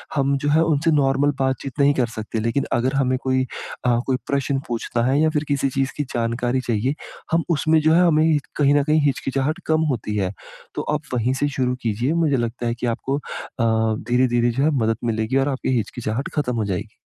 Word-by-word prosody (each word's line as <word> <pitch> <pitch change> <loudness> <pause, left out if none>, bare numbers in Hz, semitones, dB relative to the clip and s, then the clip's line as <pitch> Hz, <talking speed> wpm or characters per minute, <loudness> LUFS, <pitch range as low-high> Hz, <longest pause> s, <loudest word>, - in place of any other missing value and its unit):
हम 140 -1 +2
जो 145 +2 -1
है 155 +2 +4
उनसे 160 0 +2
नॉर्मल 145 -1 +3
बातचीत 130 -1 -2
नहीं 140 0 +5
कर 125 -3 +1
सकते 110 +1 -4
लेकिन 115 +5 0
अगर 125 +3 +1
हमें 130 -1 +2
कोई 130 0 +1 0.4
अ, 120 -1 +3
कोई 130 -1 +1
प्रश्न 140 0 0
पूछना 120 0 -2
है 135 +3 +2
या 160 - +4
फिर 150 -1 0
किसी 140 -1 +1
चीज़ 135 +1 -1
की 145 - 0
जानकारी 120 +2 0
चाहिए, 120 +5 0 0.4
हम 165 0 +3
उसमें 160 0 +3
जो 155 +1 +4
है 170 - +5
हमें 155 -1 +4 0.2
कहीं 145 -1 +4
न 145 - +3
कहीं 155 +1 +2
हिचकिचाहट 135 +1 -1
कम 160 0 +2
होती 105 -4 -3
है। 95 -2 0 0.4
तो - - -1
आप 150 - -1
वहीं 125 +1 +1
से 145 - +3
शुरू 125 -2 -1
कीजिए, 120 +6 0
मुझे 160 -5 +2
लगता 120 +1 -2
है 115 - -1
कि 120 - -4
आपको 135 +4 -1
अ, 110 -5 -1
धीरे-धीरे 120 -1 +3
जो - - +3
है 155 - +3
मदद 115 -1 +1
मिलेगी 115 +3 0
और 135 +1 +2
आपकी 130 -1 -1
हिचकिचाहट 115 +3 -3
ख़त्म 125 -5 0
हो 110 - 0
जाएगी। 95 -3 -4
130 Hz, 210 wpm, -22 LUFS, 120-145 Hz, 0.4 s, नहीं